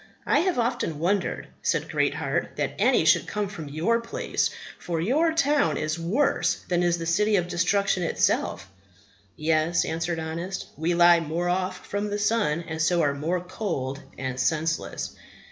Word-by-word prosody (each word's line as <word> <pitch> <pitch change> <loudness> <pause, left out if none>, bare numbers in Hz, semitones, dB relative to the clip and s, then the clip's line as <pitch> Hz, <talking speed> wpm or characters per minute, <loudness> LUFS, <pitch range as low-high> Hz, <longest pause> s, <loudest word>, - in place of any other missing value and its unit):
I - - +3
have 360 -1 +1
often 230 -10 -1
wondered, 180 +5 -1
said - - 0
Greatheart, - - -1
that - - -1
any - - +4
should - - +4
come 210 -1 -2
from 165 -7 -8
your 175 +11 +1
place; 230 - -1 0.3
for 170 -2 -3
your 290 - +2
town 295 -2 +2
is 155 +2 -2
worse 210 +13 +1
than 175 -1 +1
is 175 -1 +2
the 165 - -5
City 210 +6 +2
of 175 -3 +1
Destruction 180 +2 +1
itself. 165 - 0 0.7
Yes, 160 +2 +1
answered 165 +1 -2
Honest, 165 +4 -4
we 165 +3 0
lie 175 0 +7
more 165 +2 -2
off 185 +1 -2
from 205 +1 -2
the 205 - -2
sun, 205 -7 +1
and 160 0 -3
so 170 +1 +3
are 145 -1 +2
more 165 +5 -1
cold 165 -8 -4 0.2
and 130 -1 -4
senseless. 160 +2 -1
175 Hz, 160 wpm, -26 LUFS, 160-205 Hz, 0.7 s, lie